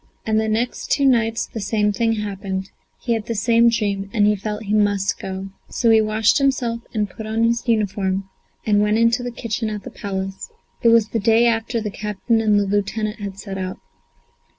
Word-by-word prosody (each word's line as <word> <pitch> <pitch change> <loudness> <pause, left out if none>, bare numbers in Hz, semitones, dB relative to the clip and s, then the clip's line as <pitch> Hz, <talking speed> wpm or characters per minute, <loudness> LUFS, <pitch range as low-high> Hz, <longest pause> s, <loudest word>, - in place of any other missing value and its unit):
And 220 0 +2
the 220 - 0
next 230 +3 -2
two 280 - +3
nights 230 -3 +2
the 225 - -7
same 210 +1 +1
thing 225 +1 +1
happened; 195 -2 -4 0.3
he 235 - -1
had 220 -2 -3
the 230 - -2
same 230 +2 +4
dream, 200 -3 -1
and 205 -1 +3
he 210 0 +4
felt 210 +2 -5
he 205 0 -2
must 205 -2 +1
go. 190 0 -5 0.2
So 230 -2 +2
he 220 0 +6
washed 215 +2 +2
himself 255 -4 +1
and 210 -2 -1
put 215 +3 -9
on 220 +1 0
his 235 +2 +1
uniform, 195 -3 0 0.4
and 205 -1 +3
went 210 +1 +2
into 230 +1 +3
the 245 - -3
kitchen 230 -1 -3
at 210 -2 -5
the - - -8
Palace. 195 -1 -5 0.3
It - - +3
was 230 -2 +4
the 230 - -1
day 225 +2 +4
after 230 0 +1
the 210 -2 -4
captain 210 +3 -1
and 210 -2 +3
the 200 - +1
lieutenant 210 +2 -1
had 200 -2 -6
set 195 -1 -6
out. 185 0 -4
215 Hz, 205 wpm, -21 LUFS, 200-230 Hz, 0.4 s, he